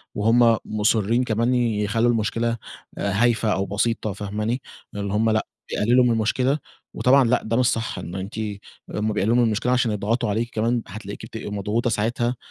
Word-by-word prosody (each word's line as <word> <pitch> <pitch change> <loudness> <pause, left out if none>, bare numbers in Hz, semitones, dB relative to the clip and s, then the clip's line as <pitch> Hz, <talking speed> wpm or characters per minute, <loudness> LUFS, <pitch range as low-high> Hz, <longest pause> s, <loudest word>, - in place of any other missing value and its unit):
وهم 115 +2 +4
مُصِرين 110 +3 +1
كمان 115 +1 +1
يخلّوا 115 -1 +1
المشكلة 115 +1 0 0.4
هايفة 110 +2 +1
أو 95 - -1
بسيطة، 105 +1 -1
فاهماني، 105 +5 -3 0.3
اللي 100 -1 -3
هم 110 +2 +2
لأ 110 0 +1 0.2
بيقلِّلوا 125 +4 +3
من 120 - +3
المشكلة، 125 +6 +1 0.3
وطبعًا 135 +1 +4
لأ 125 +1 +2
ده 115 +1 -1
مش 125 - +3
صح 115 -1 -1
إنه 90 +3 -6
أنتِ 100 +3 -6 0.6
هُم 105 +1 0
بيقلِّلوا 110 +3 +1
من 125 - +4
المشكلة 115 +2 +1
عشان 125 -3 +2
يضغطوا 105 +2 -1
عليكِ 115 +3 -1
كمان، 115 +2 +1
هتلاقيكي 100 +1 -8
بتبقي 110 -2 -7
مضغوطة 105 +4 -1
ساعتها، 120 +3 0
115 Hz, 165 wpm, -23 LUFS, 105-120 Hz, 0.6 s, وهم